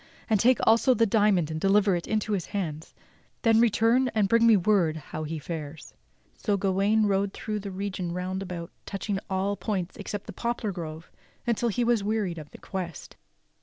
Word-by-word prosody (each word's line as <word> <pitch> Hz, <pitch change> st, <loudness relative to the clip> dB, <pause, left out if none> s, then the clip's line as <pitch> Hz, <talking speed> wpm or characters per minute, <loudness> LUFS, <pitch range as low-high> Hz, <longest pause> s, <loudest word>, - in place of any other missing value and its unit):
And 215 Hz, -3 st, +2 dB
take 250 Hz, +4 st, +5 dB
also 230 Hz, +3 st, +5 dB
the 230 Hz, -, +4 dB
diamond 200 Hz, -6 st, +2 dB
and 155 Hz, 0 st, -4 dB
deliver 195 Hz, -1 st, +4 dB
it 170 Hz, -, -4 dB
into 215 Hz, 0 st, -1 dB
his 180 Hz, -8 st, -2 dB
hands, 160 Hz, -4 st, -4 dB, 0.5 s
then 225 Hz, -2 st, +5 dB
return 235 Hz, +3 st, +3 dB
and 210 Hz, -2 st, +3 dB
bring 230 Hz, +3 st, +4 dB
me 225 Hz, -2 st, +7 dB
word 180 Hz, -5 st, +2 dB
how 155 Hz, +1 st, -6 dB
he 160 Hz, +1 st, -4 dB
fares." 155 Hz, 0 st, -7 dB, 0.4 s
So 205 Hz, -2 st, 0 dB
Gawain 200 Hz, +3 st, +2 dB
rode 195 Hz, -1 st, +1 dB
through 215 Hz, -1 st, -4 dB
the 200 Hz, 0 st, -6 dB
region 185 Hz, -2 st, -4 dB
round 185 Hz, +2 st, -3 dB
about 180 Hz, -3 st, -6 dB, 0.2 s
touching 200 Hz, 0 st, -3 dB
at 195 Hz, -, -7 dB
all 195 Hz, +1 st, 0 dB
points 195 Hz, -4 st, -3 dB
except 205 Hz, -2 st, -5 dB
the -, -, -8 dB
poplar 235 Hz, -3 st, -2 dB
grove 165 Hz, -2 st, -7 dB, 0.3 s
until 235 Hz, 0 st, +1 dB
he 240 Hz, +3 st, 0 dB
was 235 Hz, -3 st, +2 dB
wearied 205 Hz, -5 st, -1 dB
of 150 Hz, -1 st, -10 dB
the -, -, -13 dB
quest. 180 Hz, -4 st, -6 dB
195 Hz, 190 wpm, -27 LUFS, 175-220 Hz, 0.5 s, me